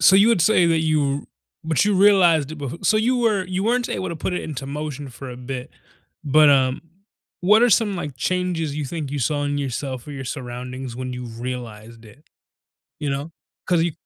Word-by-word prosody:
so 190 - +7
you 200 +4 +6
would 195 -8 +3
say 185 -4 +4
that 165 -1 +2
you 145 -3 0 0.4
but 160 -2 +2
you 210 - +2
realized 180 -7 +4
it 160 - -7
be 140 -3 -5
so 215 - +3
you 240 +4 +2
were 215 -5 +2
you 185 +1 -2
weren't 240 +2 +1
able 185 - -3
to 170 - -5
put 185 - -3
it - - -2
into 135 -3 -6
motion 145 -1 -5
for 130 +1 -9
a 125 - -8
bit, 125 0 -6 0.5
but, 150 +1 +5
um, 130 -1 +3 0.6
what 210 +6 +5
are 245 - +5
some, 210 0 +3
like, 145 -7 -5
changes 175 -1 -1
you 150 -1 -3
think 145 -1 -5
you 145 - -2
saw 145 +3 0
in 145 0 -1
yourself 135 -1 -4
or - - -6
your 135 -2 -6
surroundings 125 -1 -6
when 130 0 -4
you 125 0 -6
realized 115 -1 -7
it? 110 +8 -17 0.8
You 150 - -2
know? 140 +3 -3 0.4
'Cause 175 -3 +3
you 170 -1 0
145 Hz, 210 wpm, -22 LUFS, 130-180 Hz, 0.8 s, so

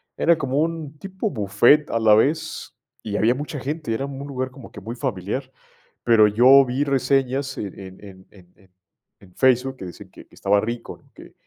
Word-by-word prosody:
Era 170 0 +3
como 135 -1 -1
un 160 -2 -4
tipo 190 +2 -4
bufet 120 +7 +3
a 115 - 0
la 110 -1 +5
vez 155 +8 -1 0.3
y 105 -2 -4
había 115 +4 +2
mucha 145 +1 -6
gente. 145 -1 -4
Era 135 +5 -2
un 140 0 -7
lugar 130 -2 -4
como 130 -1 -13
que 105 - -11
muy 115 +4 -7
familiar. 125 +1 -4 0.5
Pero 115 -3 +5
yo 130 +6 +6
vi 130 +3 -1
reseñas 135 0 0
en 100 -2 -6
en 95 -1 -11
en 95 -2 -14
en 90 -3 -20
en 95 -3 -25 0.5
en 90 -2 -19
Facebook 130 0 +2
que 95 - -8
decían 90 - -11
que - - -15
que - - -21
estaba 100 +1 +2
rico, 115 +2 -6
que - - -15
130 Hz, 195 wpm, -22 LUFS, 105-140 Hz, 0.5 s, yo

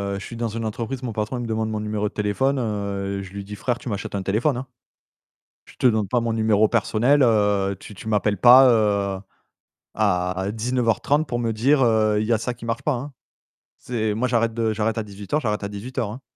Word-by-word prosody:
heu, - - -4
je 100 - -8
suis 115 - -8
dans 115 0 -2
une 115 +1 -4
entreprise, 115 +4 -4
mon 120 -3 -3
patron, 105 +4 -2
il 120 - -4
me - - -5
demande 110 0 -1
mon 110 -1 -3
numéro 105 0 -2
de - - -26
téléphone, 120 +7 0
heu 100 -3 -3
je 95 - -10
lui 100 0 -6
dis: 105 +1 -8
«Frère, 120 +3 -2
tu 120 - -12
m'achètes 100 0 -4
un 100 - -1
téléphone», 115 +8 +1
hein. 130 +1 -6 1.0
«Je - - -16
te - - +4
donne 110 -4 +1
pas 120 +5 +1
mon 115 0 -1
numéro 110 -1 +3
personnel, 120 +5 +2
heu, 105 -4 +2
tu 105 - -11
tu 105 - -10
m'appelles 105 -1 +1
pas, 125 +5 +8
heu, 100 -4 +1 0.8
à 90 -2 0
19:30 125 +5 0
pour 120 - -2
me 115 -1 0
dire, 135 +6 +2
heu: 110 -2 +3
"Il 110 - -2
y 120 - +3
a - - +3
ça 120 +3 -3
qui 115 0 -11
marche 115 +4 -3
pas", 150 - +1
hein». 135 +3 -5 0.7
C'est 110 -4 -2
moi, 120 +4 0
j'arrête 115 -2 +1
de 115 -1 0
j'arrête 110 +1 -1
à - - 0
18:00, 105 +7 -3
j'arrête 105 -5 -2
à - - -2
18:00, 110 +2 -4
hein. 125 +5 -10
110 Hz, 230 wpm, -23 LUFS, 105-120 Hz, 1.0 s, pas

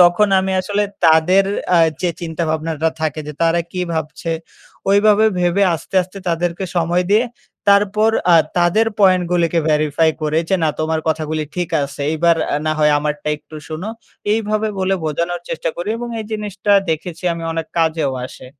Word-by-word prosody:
তখন 175 +4 +4
আমি 190 0 -2
আসলে 205 +2 -1 0.2
তাদের 170 +5 +5 0.3
আ - - +6 0.2
যে 175 - +2
চিন্তাভাবনাটা 160 -1 -1
থাকে 155 -1 -1
যে - - -5
তারা 165 +1 +3
কি 180 - -3
ভাবছে? 160 +1 -3 0.6
ঐভাবে 210 +2 +5
ভেবে 175 +3 +2
আস্তে, 160 - -9
আস্তে 185 +2 -11
তাদেরকে 170 +2 -1
সময় 175 +2 +2
দিয়ে 220 +4 +4 0.4
তারপর 205 +2 +4 0.2
আ - - +8 0.2
তাদের 175 +6 +3
পয়েন্টগুলিকে 180 -3 +3
verify 155 +1 +2
করে 155 +1 +1
যে 190 - +2
না - - +3
"তোমার 160 0 0
কথাগুলি 155 0 -1
ঠিক 175 -2 -2
আছে 140 +1 -6
এইবার 165 +1 +3 0.2
আ - - +2
না 155 - +2
হয় 150 -1 +4
আমারটা 150 0 -3
একটু 155 +1 -13
শোনো।" 160 +7 -5 0.4
এইভাবে 215 0 0
বলে 190 +1 +1
বোঝানোর 170 +3 -2
চেষ্টা 165 - -2
করি 175 +4 -4
এবং 240 0 -5
এই - - -5
জিনিসটা 205 -1 -1 0.2
দেখেছি 165 +2 -4
আমি 165 - -7
অনেক 165 -1 -3
কাজেও 160 -4 +1
আসে। 130 - -13
170 Hz, 165 wpm, -18 LUFS, 155-195 Hz, 0.6 s, আ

